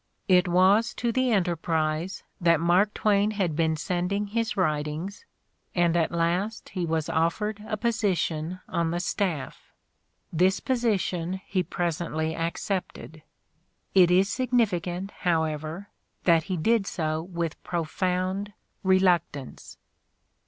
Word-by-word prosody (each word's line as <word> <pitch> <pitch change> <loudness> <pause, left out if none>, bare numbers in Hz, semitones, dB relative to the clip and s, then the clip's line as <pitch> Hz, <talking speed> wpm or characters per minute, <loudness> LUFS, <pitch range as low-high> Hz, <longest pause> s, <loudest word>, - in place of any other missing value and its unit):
It 180 -2 +5
was 190 +6 +4
to 235 - 0
the 255 +2 +1
Enterprise 170 -2 0 0.2
that 170 -2 +4
Mark 180 +5 +3
Twain 205 -1 +2
had 190 -7 -1
been 160 -1 +1
sending 180 +5 -1
his 225 +2 -2
writ 150 -5 +1
ings, 180 +6 -6 0.5
and 175 -1 +3
at 165 -2 +2
last 175 +6 -1
he 180 -3 -3
was 160 -1 -1
offered 210 +6 0
a 215 - -2
position 185 -7 -1
on 170 -1 0
the 170 +1 -1
staff. 175 -6 -3 0.6
This 185 +3 +3
position 190 -8 0
he 190 -2 0
presently 160 -2 -2
accepted. 165 -1 -4 0.7
It 180 -3 +6
is 185 +2 +4
significant, 200 -6 0
however, 160 +2 -1 0.3
that 165 -2 +4
he 190 -2 -2
did 220 +4 +2
so 155 -1 -1
with 170 -2 -4
profound 185 +4 -2 0.3
reluctance. 180 -7 +1
180 Hz, 120 wpm, -26 LUFS, 165-200 Hz, 0.7 s, It